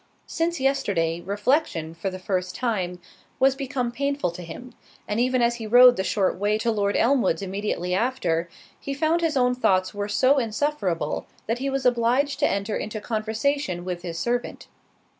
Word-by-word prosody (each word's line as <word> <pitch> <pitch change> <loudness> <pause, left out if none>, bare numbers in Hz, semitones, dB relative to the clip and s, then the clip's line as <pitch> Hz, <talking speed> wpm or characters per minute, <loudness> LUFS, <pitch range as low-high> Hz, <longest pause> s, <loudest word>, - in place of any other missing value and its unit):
Since 340 0 -1
yesterday, 200 -12 0
reflection, 200 - 0
for 170 +4 -3
the 185 - -6
first 185 -1 -2
time, 185 -8 -2 0.4
was 265 0 +5
become 260 -3 -2
painful 280 -5 -1
to 170 - -9
him; 245 +9 -9 0.3
and 210 +2 -1
even 255 0 +2
as 235 0 +2
he 225 -2 -6
rode 245 +2 +8
the 190 - -1
short 190 -2 0
way 205 +1 +1
to 230 +1 0
Lord 205 -2 0
Elmwood's 230 -9 +2
immediately 190 -2 -2
after, 185 -7 0 0.3
he 275 - -4
found 315 +4 +1
his 320 -4 +1
own 250 -1 +3
thoughts 185 -6 +1
were 205 0 -3
so 260 +6 +3
insufferable, 215 - -1 0.2
that 230 +2 -1
he 275 +1 -1
was 270 -1 -2
obliged 250 +4 +2
to 290 - +3
enter 200 +2 -2
into 215 0 -4
conversation 220 -2 -2
with 180 -1 -4
his 170 -2 -5
servant. 240 +6 -2
225 Hz, 175 wpm, -24 LUFS, 185-265 Hz, 0.4 s, rode